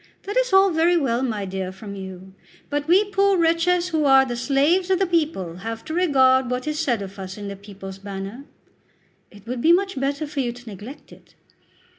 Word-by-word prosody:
"That 410 - -5
is - - +2
all 385 0 +5
very 335 +2 +3
well, 255 -6 0
my 220 -6 -2
dear, 190 -1 -4
from 200 +2 -9
you; 190 -1 -9 0.4
but 290 +1 -2
we 375 +5 +5
poor 395 -1 +3
wretches 345 +2 +2
who 315 -3 0
are 270 -1 +6
the 245 -2 -4
slaves 290 +9 +2
of 380 - +3
the 385 - +2
people 305 - -1
have 225 +4 -6
to 315 - -5
regard 265 -7 +3
what 250 0 -2
is 305 0 -2
said 240 -9 0
of 195 +1 -10
us 190 0 -7
in 205 -1 -6
the 200 - -6
'People's 195 -1 -10
Banner.'" 200 +6 -7 0.8
"It 205 0 -17
would 240 +1 -4
be 325 - +5
much 380 -3 +2
better 280 +3 -1
for 290 -1 -6
you 240 -3 -1
to 245 0 -15
neglect 220 +8 -10
it." - - -18
265 Hz, 210 wpm, -23 LUFS, 200-330 Hz, 0.8 s, are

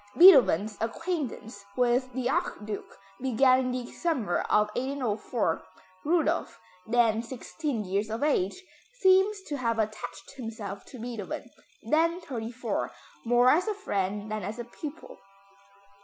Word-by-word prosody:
Beethoven's 245 - +7
acquaintance 230 - -3
with 250 +1 +2
the 250 -1 -1
Archduke 210 -5 -3 0.2
began 255 0 +4
in 255 -1 -1
the 250 0 -2 0.2
winter 260 - +1
of 210 0 +4
1804. 235 -7 -1 0.4
Rudolph, 330 +1 +1 0.3
then 230 -1 +3
sixteen 250 0 -4
years 200 +3 -1
of 225 +5 -2
age, 295 - +1 0.4
seems 385 0 +4
to 290 - -4
have 230 -3 0
attached 215 -1 -4
himself 220 -5 -6
to 255 - -11
Beethoven, 230 -4 -5 0.3
then 335 +3 +2
thirty 240 -9 -5
four, 220 - -2 0.3
more 245 +2 +5
as 345 +9 +3
a 425 - 0
friend 205 - -2
than 215 0 -2
as 205 +4 -5
a 240 - -4
pupil. 295 +6 -9
245 Hz, 130 wpm, -28 LUFS, 215-290 Hz, 0.4 s, Beethoven's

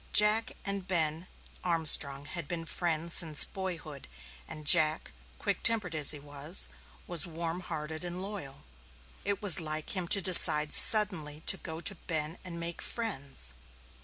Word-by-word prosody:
Jack 210 +2 +4
and 200 -2 -7
Ben 165 -1 -3 0.4
Armstrong 150 -5 +4
had 170 0 -6
been 165 0 -7
friends 170 0 -3
since 155 -4 +4
boyhood 170 -7 -9 0.4
and 155 -1 -11
Jack, 155 0 +2 0.3
quick - - -5
tempered 215 -7 +1
as 150 -3 -1
he 150 - +2
was, 145 +4 -1 0.4
was 175 -1 -5
warm 165 +1 -7
hearted 160 -2 -7
and 175 0 -7
loyal. 185 -9 -9 0.6
It 200 0 -5
was 190 -3 +5
like 155 +2 -6
him 185 -2 -3
to 200 - +3
decide 155 -5 +5
suddenly 170 -9 +5
to 190 - +5
go 160 -3 -9
to 200 - -3
Ben 160 -2 -6
and 170 -2 -9
make 170 0 -6
friends. 140 - -5
165 Hz, 150 wpm, -28 LUFS, 155-185 Hz, 0.6 s, was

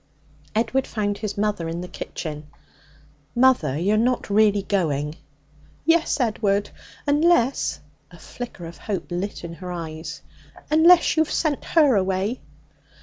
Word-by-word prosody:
Edward 235 +4 +1
found 205 -2 -2
his 210 -2 -4
mother 205 -5 -1
in 170 +1 -4
the 180 - -6
kitchen. 155 -4 -6 0.9
'Mother, 250 - +3
you 190 +6 +1
are - - +3
not 240 -1 0
really 205 -1 +4
going?' 150 -7 0 0.7
'Yes, 330 -1 +2
Edward, 205 -4 0 0.3
unless' 290 -3 +2 0.3
a - - -15
flicker 240 -8 -8
of 165 +1 -10
hope 195 -4 -4
lit 185 +4 -3
her 175 +2 -7
eyes 160 -2 -6 0.5
'unless 335 +3 +6
you 315 - +6
have 315 - -8
sent 305 -4 0
her 295 -7 +4
away.' 195 +4 0
205 Hz, 135 wpm, -23 LUFS, 175-255 Hz, 0.9 s, unless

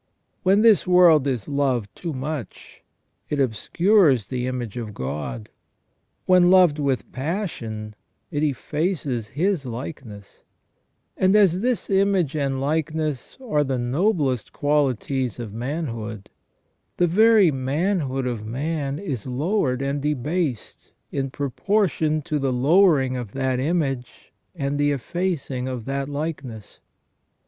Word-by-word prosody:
When 195 +3 +4
this 220 -5 +5
world 175 -6 +6
is 125 -7 -2
loved 130 -8 -1
too 170 - -5
much, 135 -4 -6 0.5
it 145 - -1
obscures 135 - +3
the 125 -1 -2
image 125 -5 -4
of 110 -4 -6
God; 75 - -5 0.7
when 180 -1 +5
loved 180 -5 +5
with 140 -3 -1
passion 130 - -4 0.4
it 145 -2 -1
effaces 150 - -1
His 165 - 0
likeness; 120 -5 -8 0.7
and 190 +2 +3
as 190 -3 +4
this 245 0 0
image 195 -6 +2
and 135 -3 -1
likeness 155 -1 -2
are 150 -9 +2
the 135 -2 -1
noblest 135 - 0
qualities 135 -4 0
of 115 -4 -7
manhood, 115 - -5 0.7
the 175 - +4
very 210 0 +5
manhood 135 0 -1
of 120 -4 -3
man 140 +4 -3
is 140 - -5
lowered 135 -1 0
and 140 +1 -1
debased 150 - -3 0.2
in 135 -1 -2
proportion 155 - 0
to 150 -1 -2
the 135 -1 0
lowering 140 0 +4
of 120 -5 -6
that 130 -1 -1
image 135 -4 -2 0.2
and 140 -2 -2
the 145 0 +3
effacing 145 -3 -2
of 125 -4 -5
that 140 +1 -3
likeness. 145 -7 -6
140 Hz, 120 wpm, -23 LUFS, 125-170 Hz, 0.7 s, world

